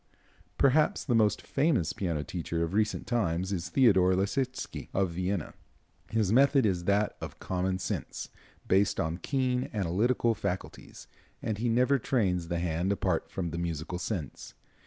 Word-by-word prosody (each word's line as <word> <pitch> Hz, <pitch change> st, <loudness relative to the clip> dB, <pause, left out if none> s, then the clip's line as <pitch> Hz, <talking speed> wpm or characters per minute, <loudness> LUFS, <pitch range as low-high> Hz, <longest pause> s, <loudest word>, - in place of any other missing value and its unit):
Perhaps 145 Hz, +3 st, +3 dB
the 125 Hz, -, +1 dB
most 105 Hz, -2 st, +3 dB
famous 135 Hz, -, +1 dB
piano 85 Hz, -6 st, -2 dB
teacher 85 Hz, -1 st, -3 dB
of 85 Hz, +2 st, -3 dB
recent 105 Hz, +1 st, 0 dB
times 95 Hz, -6 st, 0 dB
is 90 Hz, -3 st, -3 dB
Theodore 95 Hz, -8 st, +4 dB
Leschetitzky, 105 Hz, +8 st, -2 dB
of 95 Hz, -2 st, +1 dB
Vienna. 90 Hz, -1 st, -2 dB, 0.6 s
His 110 Hz, -3 st, +1 dB
method 135 Hz, 0 st, +5 dB
is 90 Hz, -4 st, 0 dB
that 100 Hz, +2 st, +2 dB
of -, -, -7 dB
common 95 Hz, 0 st, -1 dB
sense, 95 Hz, -, -4 dB, 0.4 s
based 95 Hz, +2 st, +3 dB
on 80 Hz, +2 st, -1 dB
keen 130 Hz, -, 0 dB
analytical 110 Hz, +6 st, +1 dB
faculties, 95 Hz, -3 st, -5 dB, 0.4 s
and 105 Hz, -2 st, -2 dB
he 120 Hz, +1 st, 0 dB
never 125 Hz, +4 st, +3 dB
trains 95 Hz, -9 st, 0 dB
the 85 Hz, 0 st, -2 dB
hand 85 Hz, +2 st, 0 dB
apart 100 Hz, -, 0 dB
from 85 Hz, -3 st, -3 dB
the 85 Hz, -, -4 dB
musical 85 Hz, +1 st, -3 dB
sense. 90 Hz, -, -5 dB
95 Hz, 150 wpm, -29 LUFS, 90-115 Hz, 0.6 s, method